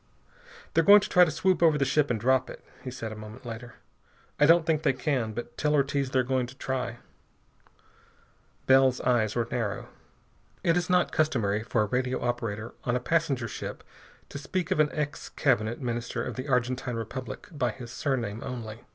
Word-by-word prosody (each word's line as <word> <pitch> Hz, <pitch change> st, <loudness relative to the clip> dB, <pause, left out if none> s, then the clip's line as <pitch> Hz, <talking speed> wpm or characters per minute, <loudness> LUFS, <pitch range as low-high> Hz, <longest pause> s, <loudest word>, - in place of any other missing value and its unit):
"They're -, -, +4 dB
going 205 Hz, +1 st, +8 dB
to -, -, -4 dB
try 180 Hz, 0 st, +6 dB
to -, -, -1 dB
swoop 185 Hz, +3 st, +1 dB
over 160 Hz, -3 st, +5 dB
the 140 Hz, -, +2 dB
ship 145 Hz, +2 st, +2 dB
and 115 Hz, -3 st, 0 dB
drop 130 Hz, +3 st, +2 dB
it," -, -, -11 dB, 0.2 s
he 130 Hz, -, -5 dB
said 115 Hz, -3 st, -6 dB
a -, -, -6 dB
moment 110 Hz, +4 st, -10 dB
later. 120 Hz, 0 st, -7 dB, 0.6 s
"I 150 Hz, -, +6 dB
don't 165 Hz, 0 st, +6 dB
think 160 Hz, -2 st, +1 dB
they 135 Hz, -, +2 dB
can. 130 Hz, -4 st, -1 dB
But 120 Hz, +2 st, -7 dB
tell 150 Hz, 0 st, +2 dB
Ortiz 140 Hz, -1 st, +1 dB
they're 130 Hz, -1 st, +2 dB
going 130 Hz, -1 st, 0 dB
to 130 Hz, -, -12 dB
try." 130 Hz, -3 st, -3 dB, 1.7 s
Bell's 130 Hz, -1 st, +5 dB
eyes 110 Hz, -4 st, +1 dB
were 120 Hz, -1 st, 0 dB
narrow. -, -, -2 dB, 0.7 s
It 165 Hz, -, +3 dB
is 175 Hz, 0 st, 0 dB
not 180 Hz, -1 st, +3 dB
customary 115 Hz, -, +1 dB
for 115 Hz, -1 st, 0 dB
a -, -, 0 dB
radio 125 Hz, +4 st, -1 dB
operator 115 Hz, -2 st, -3 dB
on 120 Hz, -, 0 dB
a -, -, +1 dB
passenger 135 Hz, -4 st, 0 dB
ship -, -, -6 dB, 0.5 s
to 140 Hz, -, -6 dB
speak 175 Hz, +4 st, -3 dB
of -, -, +1 dB
an 150 Hz, -1 st, +4 dB
ex 150 Hz, -1 st, -4 dB
Cabinet 120 Hz, -4 st, +1 dB
Minister 120 Hz, -2 st, -3 dB
of -, -, -4 dB
the 130 Hz, +3 st, -5 dB
Argentine 125 Hz, -1 st, 0 dB
Republic 115 Hz, 0 st, -6 dB
by 140 Hz, -6 st, 0 dB
his 120 Hz, +1 st, -8 dB
surname 120 Hz, -6 st, -2 dB
only. 115 Hz, -2 st, -6 dB
130 Hz, 190 wpm, -28 LUFS, 115-145 Hz, 1.7 s, going